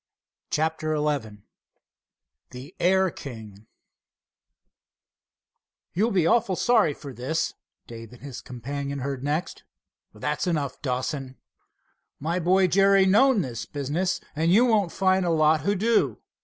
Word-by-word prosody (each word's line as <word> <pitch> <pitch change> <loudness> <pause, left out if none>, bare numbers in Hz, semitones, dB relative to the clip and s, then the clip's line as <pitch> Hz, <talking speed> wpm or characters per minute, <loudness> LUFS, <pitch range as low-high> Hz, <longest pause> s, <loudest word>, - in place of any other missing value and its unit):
CHAPTER 155 0 -1
XI 135 -9 -2 1.1
THE 130 +7 -11
AIR 190 +1 +3
KING 110 -7 -10 2.3
"You'll 210 +7 +1
be 185 -7 +2
awful 195 +1 +2
sorry 215 - +3
for 140 -2 -9
this," 145 +7 -2 0.3
Dave 115 -1 -10
and 125 +1 -15
his 140 -2 -7
companion 140 +3 -5
heard 135 -1 -4
next. 150 +5 -3 0.5
"That's 150 +10 -3
enough, 145 -6 -2
Dawson." 130 0 -3 0.8
"My 165 +5 -1
boy, 185 +2 +3
Jerry, 195 +1 +4
knows 215 +2 +4
this 120 -4 -6
business, 150 +7 -2 0.2
and 160 +2 +1
you 225 +7 +6
won't 210 -7 +2
find 190 0 +2
a 175 - 0
lot 155 -1 +3
who 200 +7 0
do." 225 +4 +1
155 Hz, 125 wpm, -25 LUFS, 135-190 Hz, 2.3 s, you